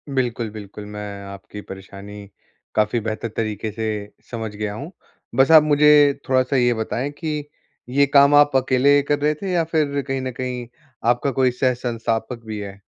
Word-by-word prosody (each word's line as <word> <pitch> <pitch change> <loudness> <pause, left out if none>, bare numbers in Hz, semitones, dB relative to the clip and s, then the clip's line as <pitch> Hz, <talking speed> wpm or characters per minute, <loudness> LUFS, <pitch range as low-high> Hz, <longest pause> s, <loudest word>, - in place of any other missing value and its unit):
बिल्कुल, 120 -3 -1
बिल्कुल 105 -1 -9
मैं 105 -1 -7
आपकी 100 +1 -9
परेशानी 100 +1 -10 0.5
काफ़ी 105 +2 +2
बेहतर 110 +1 -3
तरीके 110 -1 -2
से 110 +1 -3 0.4
समझ 110 -3 -4
गया 105 0 -3
हूँ, 140 - -7 0.4
बस 135 +5 +4
आप 160 -2 +9
मुझे 150 -1 +5 0.2
थोड़ा-सा 130 +1 +2
ये 120 -2 +3
बताएँ 120 +5 -3
कि 150 0 -4 0.5
ये 140 +3 +4
काम 140 0 +7
आप 145 -1 +5
अकेले 130 +2 +4
कर 145 0 +1
रहे 150 +1 +2
थे 195 -2 -3
या 175 -2 +2
फिर 145 -3 +1
कहीं 135 -1 -2
न 130 0 -3
कहीं 125 -2 -4 0.4
आपका 120 +3 +1
कोई 130 0 +2
सह 125 +1 +1
संस्थापक 115 -1 -3
भी 110 -1 -5
है? 100 -1 -8
125 Hz, 170 wpm, -21 LUFS, 110-140 Hz, 0.5 s, आप